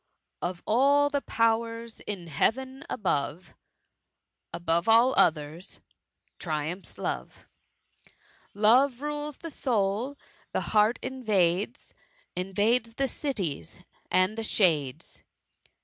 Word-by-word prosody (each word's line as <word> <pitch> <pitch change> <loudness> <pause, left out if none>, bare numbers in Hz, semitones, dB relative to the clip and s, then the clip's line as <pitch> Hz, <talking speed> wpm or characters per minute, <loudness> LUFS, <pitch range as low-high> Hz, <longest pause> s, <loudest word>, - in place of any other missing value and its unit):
Of 175 0 -4
all 285 +5 +4
the 285 0 0
powers 230 0 0
in 195 -4 -6
Hearen 260 - -1
above 165 -3 -2 0.5
> - - -57
Above 170 +3 0
all 235 +4 +6
otherg^ 160 +2 +1 0.6
triumphs 160 +3 -4
Love; - - -5 1.1
Love 245 +5 +4
rules 295 -1 -3
the 330 - -8
soul 235 +1 -1 0.2
— - - -32
the - - 0
heart 215 +2 +4
invades^ 215 -5 0 0.4
Invades 215 +6 +1
the 275 +1 +1
cities 195 - -3 0.3
and 185 +3 +2
the - - -2
shades. 160 - +1
215 Hz, 100 wpm, -28 LUFS, 175-255 Hz, 1.1 s, all